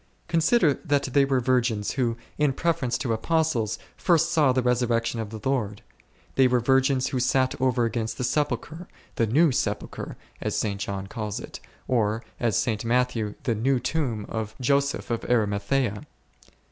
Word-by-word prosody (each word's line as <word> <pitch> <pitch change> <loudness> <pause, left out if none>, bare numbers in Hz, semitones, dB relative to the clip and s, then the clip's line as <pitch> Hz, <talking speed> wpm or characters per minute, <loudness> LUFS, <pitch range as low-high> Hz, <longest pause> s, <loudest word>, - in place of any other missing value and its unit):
Consider 165 - +3
that 145 0 +1
they 140 -1 +5
were 135 -1 +1
virgins 120 -4 +1
who, 120 -4 0 0.2
in 150 -2 +3
preference 130 -6 0
to 125 -5 -1
Apostles, 125 -3 0 0.2
first 170 -1 +2
saw 155 -6 +4
the 130 0 +1
resurrection 120 -1 +1
of 110 -2 -4
the 110 0 -7
Lord. 110 -7 -1 0.5
They 135 -1 +5
were 125 0 +2
virgins 130 +1 +2
who 130 - -1
sat 130 +1 +2
over 125 -2 +2
against 115 0 -2
the - - -2
sepulchre, 150 +5 -2 0.3
the 115 - +2
new 150 +8 +4
sepulchre, - - -3 0.2
as - - -2
St. 100 -2 -1
John 100 -1 -3
calls 105 0 -4
it, - - -9 0.3
or, 115 -2 +1 0.2
as 115 -5 +1
St. 110 -2 0
Mat 125 +2 +2
thew, 110 -3 -3
the 120 - +1
new 125 +4 +1
tomb 120 -9 -2
of 110 -1 -4
Joseph 140 +1 0
of 115 - -1
Arimathcea. 105 0 0
125 Hz, 165 wpm, -25 LUFS, 110-135 Hz, 0.5 s, they